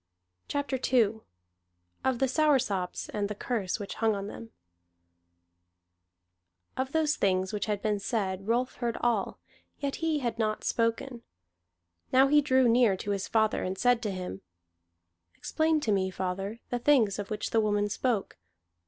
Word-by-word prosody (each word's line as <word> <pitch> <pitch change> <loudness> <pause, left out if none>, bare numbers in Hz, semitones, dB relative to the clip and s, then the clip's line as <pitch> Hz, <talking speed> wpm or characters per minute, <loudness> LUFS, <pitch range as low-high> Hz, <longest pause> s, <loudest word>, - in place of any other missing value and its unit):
CHAPTER 285 -2 -2
II 225 -4 +3 0.8
OF 260 -2 +1
THE 265 - +2
SOURSOPS, 255 - +1
AND 205 -1 -2
THE 210 - -4
CURSE 210 -3 -2
WHICH 205 - -5
HUNG 220 -1 +1
ON 200 0 -4
THEM 230 - -9 2.3
Of 260 +1 -2
those 310 -1 +2
things 190 0 +1
which 210 - -2
had 205 -2 -2
been 210 -1 +1
said, 195 -2 -2
Rolf 245 +3 0
heard 235 -2 -2
all, 230 -5 0 0.4
yet 280 -1 -3
he 325 -2 0
had 235 -5 -3
not 215 -1 -1
spoken. 230 +2 -1 0.9
Now 260 +1 +6
he 295 +1 +6
drew 260 -3 +3
near 230 -4 +4
to 205 - -4
his 200 -1 -2
father, 220 -1 +2
and 185 +1 -3
said 245 +1 +3
to 215 - -2
him: 180 - -5 0.9
"Explain 315 0 +1
to 225 - 0
me, 190 -2 +1
father, 190 +4 -4
the 245 - 0
things 235 -7 +3
of 205 - -5
which 210 -1 -3
the 225 - +3
woman 205 -1 +1
spoke. 210 - -2
225 Hz, 155 wpm, -29 LUFS, 200-255 Hz, 2.3 s, Now